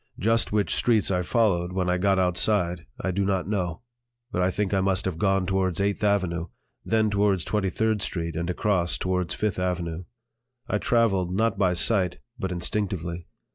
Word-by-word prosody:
Just 115 +3 +1
which 105 -1 +1
streets 110 -5 +2
I 90 -1 +1
followed 90 -3 +1
when 90 -1 -1
I 90 0 +1
got 95 +1 +2
outside 90 -3 +1
I 95 - -1
do 100 +2 0
not 95 -2 0
know, 90 -3 -2 0.5
but 90 - -1
I 90 - +3
think 100 +1 -1
I 95 - +2
must 95 -1 0
have 90 -4 -3
gone 95 -1 +2
towards 95 -2 0
Eighth 100 +1 0
Avenue, 95 -5 +1 0.4
then 110 0 +2
down 105 - 0
towards 100 -3 +1
Twenty 105 -3 0
third 110 +3 0
Street 85 -3 -3
and 85 +1 -2
across 90 -4 +1
towards 90 -1 -1
Fifth 105 -4 -1
Avenue. 90 -2 -2 0.6
I 105 - 0
traveled, 100 -8 +1
not 110 -1 +1
by 90 -3 +3
sight, 95 -1 +2 0.2
but 95 - -3
instinctively. 85 -2 -2
95 Hz, 180 wpm, -25 LUFS, 90-100 Hz, 0.6 s, I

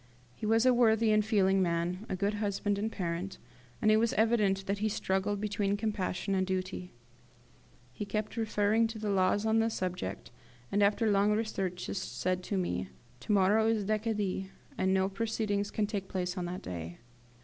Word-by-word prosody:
He 210 - -5
was 225 +2 +3
a 255 - +6
worthy 225 -2 +4
and 215 0 +4
feeling 195 -3 +3
man, 175 +3 -1
a - - -1
good 200 +3 0
husband 205 -1 -1
and 220 +2 -1
parent, 180 0 -3 0.5
and 215 - +5
it 215 - +5
was 230 +1 +2
evident 210 -4 +2
that 200 +1 -1
he 215 +1 +1
struggled 195 0 -1
between 205 -1 0
compassion 200 -2 -2
and 185 -1 +1
duty. 185 -1 -3 1.0
He 210 - -5
kept 210 +2 -3
referring 220 0 +2
to 225 0 -7
the 215 -1 -2
laws 195 +2 +2
on 220 0 +3
the 225 0 +2
subject, 180 - -4 0.4
and, 205 - +2
after 210 +2 +3
long 200 +1 +3
researches 195 -4 -2
said 185 -1 -2
to 200 - -1
me, 95 - -1 0.3
"To 125 - -4
morrow 205 +2 +4
is 220 -3 +1
Decadi, 210 -3 -1 0.3
and 190 - +1
no 190 0 +3
proceedings 205 -1 -1
can 210 - 0
take 200 -2 -4
place 180 -1 -2
on 180 -2 -3
that 180 +1 -5
day. 85 -1 -6
200 Hz, 180 wpm, -31 LUFS, 185-215 Hz, 1.0 s, a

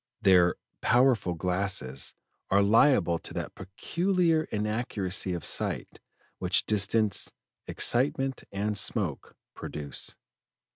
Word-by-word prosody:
Their 90 -3 +5 0.3
'powerful 120 -7 +3
glasses' 90 -7 -2 0.3
are 100 +1 +4
liable 100 - +4
to - - -9
that - - -4
peculiar 165 - 0
inaccuracy 105 -3 -1
of 85 - -6
sight - - -2 0.4
which - - +1
distance, 105 0 +1 0.4
excitement, 135 +1 +1
and 105 +2 -2
smoke 100 - -1 0.2
produce. 70 -3 -5
100 Hz, 95 wpm, -28 LUFS, 90-125 Hz, 0.4 s, Their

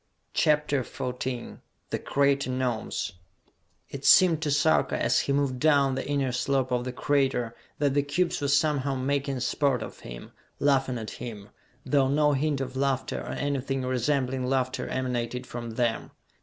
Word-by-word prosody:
CHAPTER 150 -2 +2
XIV 125 0 -5 0.3
The - - -1
Crater 140 -1 +1
Gnomes 125 -5 -2 0.8
It 140 0 -8
seemed 170 -2 +6
to 155 - -1
Sarka, 150 +2 +2
as - - +3
he - - -1
moved 140 -2 0
down 140 -2 +4
the 130 - -3
inner 140 -3 0
slope 130 +1 0
of 125 0 0
the 125 - -3
crater, 130 -3 0 0.2
that 145 -2 +1
the 145 - +3
cubes 155 +5 -1
were 140 - 0
somehow 140 -1 +2
making 135 0 -1
sport 125 -1 +1
of - - -9
him, - - -10 0.3
laughing 135 -3 +2
at 110 -2 -6
him, 105 -4 -8 0.4
though 140 -2 +3
no 150 +2 +3
hint 140 0 0
of 130 0 -5
laughter 135 -1 -1
or - - -5
anything 135 -2 -2
resembling 130 0 0
laughter 130 -1 -1
emanated 125 -1 -2
from 120 -2 -6
them. 120 -2 0
135 Hz, 155 wpm, -27 LUFS, 125-140 Hz, 0.8 s, seemed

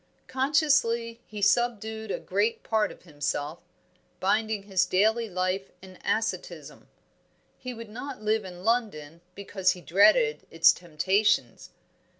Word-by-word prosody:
Consciously 260 -4 +1
he 210 -2 -6
subdued 220 0 +1
a - - -1
great 205 +4 -1
part 220 -1 +1
of - - -15
himself, 145 -1 -3 0.6
binding 215 +2 0
his 190 -2 +1
daily 220 +5 +2
life 185 +1 -2
in 185 -1 -14
asceticism. 225 0 -3 0.7
He 255 -1 -6
would 230 0 -9
not 250 +5 -7
live 215 0 0
in 180 -1 -10
London 170 -10 -1
because 190 -2 0
he 180 - -12
dreaded 320 - +3
its - - +5
temptations. 185 +5 0
210 Hz, 125 wpm, -27 LUFS, 185-230 Hz, 0.7 s, its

